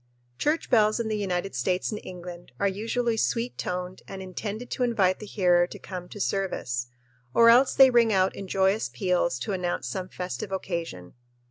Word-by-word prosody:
Church 305 Hz, +1 st, 0 dB
bells 215 Hz, -2 st, +4 dB
in 230 Hz, -1 st, -1 dB
the 215 Hz, -, 0 dB
United 195 Hz, -2 st, -2 dB
States 180 Hz, -, 0 dB
and 210 Hz, -, -5 dB
England 175 Hz, -1 st, -9 dB
are 200 Hz, -, +2 dB
usually 225 Hz, +4 st, -1 dB
sweet 235 Hz, +2 st, 0 dB
toned 180 Hz, +1 st, -4 dB
and 195 Hz, -, -7 dB
intended 205 Hz, +5 st, -6 dB
to -, -, -4 dB
invite 205 Hz, -7 st, +2 dB
the 215 Hz, -, -8 dB
hearer 175 Hz, -4 st, +3 dB
to -, -, -9 dB
come 180 Hz, -2 st, -8 dB
to 205 Hz, -, -9 dB
service, 180 Hz, -12 st, -2 dB, 0.5 s
or 230 Hz, 0 st, +7 dB
else 255 Hz, +3 st, +5 dB
they 265 Hz, -1 st, +8 dB
ring 235 Hz, -2 st, +4 dB
out 190 Hz, -1 st, +2 dB
in 195 Hz, -, -7 dB
joyous 195 Hz, -, +1 dB
peals 175 Hz, +2 st, 0 dB
to 200 Hz, -, -3 dB
announce 180 Hz, -5 st, -2 dB
some 180 Hz, +9 st, -4 dB
festive 180 Hz, -1 st, -5 dB
occasion. 170 Hz, -, -4 dB
190 Hz, 185 wpm, -26 LUFS, 180-220 Hz, 0.5 s, they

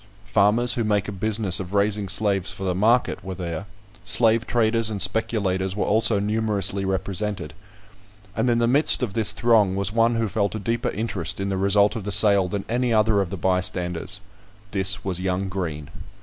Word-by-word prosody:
Farmers 110 Hz, +4 st, +3 dB
who 120 Hz, -, -1 dB
make 105 Hz, -1 st, 0 dB
a -, -, -4 dB
business 105 Hz, -1 st, -1 dB
of 95 Hz, +1 st, -6 dB
raising 100 Hz, -1 st, 0 dB
slaves 100 Hz, -2 st, 0 dB
for 95 Hz, -, -9 dB
the 95 Hz, -1 st, -1 dB
market 115 Hz, +7 st, +1 dB
were 95 Hz, -1 st, -6 dB
there; 90 Hz, +1 st, -6 dB, 0.4 s
slave 115 Hz, +1 st, +4 dB
traders 115 Hz, -1 st, +1 dB
and 105 Hz, -2 st, -4 dB
speculators 95 Hz, -2 st, 0 dB
were 105 Hz, -, -1 dB
also 110 Hz, -1 st, +2 dB
numerously 105 Hz, -2 st, 0 dB
represented; 95 Hz, -3 st, -3 dB, 0.8 s
and 125 Hz, -, 0 dB
in 120 Hz, -, +2 dB
the 120 Hz, -, +2 dB
midst 140 Hz, +3 st, +3 dB
of 110 Hz, -6 st, -3 dB
this 110 Hz, -1 st, +4 dB
throng 105 Hz, -4 st, +2 dB
was 100 Hz, 0 st, -2 dB
one 115 Hz, +1 st, +2 dB
who 115 Hz, -1 st, 0 dB
felt 100 Hz, 0 st, -2 dB
a -, -, -3 dB
deeper 115 Hz, +4 st, -2 dB
interest 100 Hz, -7 st, -2 dB
in 100 Hz, 0 st, -2 dB
the 95 Hz, -, -2 dB
result 100 Hz, +3 st, +2 dB
of 110 Hz, -, -5 dB
the 105 Hz, -, -4 dB
sale 100 Hz, -2 st, +5 dB
than 100 Hz, +1 st, -4 dB
any 120 Hz, +1 st, -1 dB
other 110 Hz, -2 st, +2 dB
of 95 Hz, -, -3 dB
the 95 Hz, -, -6 dB
bystanders; 90 Hz, +1 st, -1 dB, 0.5 s
this 100 Hz, +1 st, -1 dB
was 90 Hz, -2 st, -2 dB
young 95 Hz, +1 st, -2 dB
Green. 80 Hz, -6 st, -5 dB
100 Hz, 190 wpm, -23 LUFS, 95-110 Hz, 0.8 s, sale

